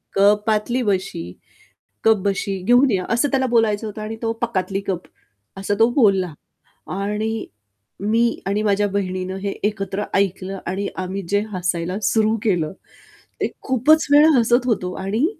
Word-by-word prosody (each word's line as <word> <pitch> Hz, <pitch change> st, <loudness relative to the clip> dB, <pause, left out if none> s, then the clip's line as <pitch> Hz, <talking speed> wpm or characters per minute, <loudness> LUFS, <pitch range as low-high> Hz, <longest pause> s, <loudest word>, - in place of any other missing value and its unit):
कपातली 210 Hz, +4 st, +2 dB
बशी, 185 Hz, -, -2 dB, 0.7 s
कप-बशी 200 Hz, -2 st, +1 dB
घेऊन 245 Hz, +5 st, +5 dB
या, 185 Hz, -3 st, 0 dB
असं 240 Hz, +5 st, +2 dB
त्याला 265 Hz, -1 st, +2 dB
बोलायचं 225 Hz, -2 st, +2 dB
होतं 215 Hz, +1 st, -7 dB
आणि 215 Hz, +1 st, -5 dB
तो 225 Hz, -, 0 dB
पकातली 195 Hz, -4 st, -1 dB
कप 180 Hz, -2 st, -2 dB, 0.5 s
असं 195 Hz, +1 st, -1 dB
तो 225 Hz, +2 st, +5 dB
बोलला. 195 Hz, -, +3 dB, 0.5 s
आणि 210 Hz, +3 st, -2 dB, 0.5 s
मी 230 Hz, +3 st, +1 dB
आणि 200 Hz, +2 st, 0 dB
माझ्या 205 Hz, -1 st, +2 dB
बहिणीनं 185 Hz, -1 st, -3 dB
हे 200 Hz, -, -1 dB
एकत्र 205 Hz, -1 st, -1 dB
ऐकलं 195 Hz, 0 st, 0 dB
आणि 190 Hz, +3 st, -2 dB, 0.2 s
आम्ही 190 Hz, +2 st, -4 dB
जे 205 Hz, 0 st, +3 dB
हसायला 180 Hz, 0 st, -2 dB
सुरू 220 Hz, +2 st, +2 dB
केलं, 175 Hz, -8 st, 0 dB, 0.7 s
ते -, -, +1 dB
खूपच 280 Hz, +5 st, +3 dB
वेळा 295 Hz, +2 st, +7 dB
हसत 240 Hz, +2 st, +3 dB
होतो 180 Hz, -6 st, 0 dB
आणि 215 Hz, +9 st, +1 dB
205 Hz, 140 wpm, -21 LUFS, 190-225 Hz, 0.7 s, वेळा